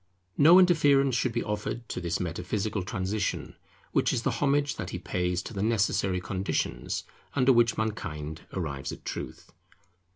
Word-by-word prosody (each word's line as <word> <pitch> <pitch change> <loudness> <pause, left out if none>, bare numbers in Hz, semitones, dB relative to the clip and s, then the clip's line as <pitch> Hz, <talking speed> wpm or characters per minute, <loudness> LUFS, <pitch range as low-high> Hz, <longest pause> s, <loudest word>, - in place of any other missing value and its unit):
No 165 +5 +8
interference 145 -7 +5
should 125 +1 +1
be 120 +1 -1
offered 105 +2 -4
to - - -4
this 85 -1 -1
metaphysical 95 +4 -2
transition, 95 +2 -2 0.4
which - - +2
is 115 - -1
the - - +1
homage 145 0 +2
that 90 - -4
he 90 - -4
pays 90 0 -1
to - - -8
the 100 - -3
necessary 100 -4 +1
conditions 95 +1 -2 0.3
under 130 -1 +5
which 115 -1 +3
mankind 80 -8 -3
arrives 75 -7 -4
at - - -10
truth. - - -6
105 Hz, 155 wpm, -28 LUFS, 90-125 Hz, 0.4 s, No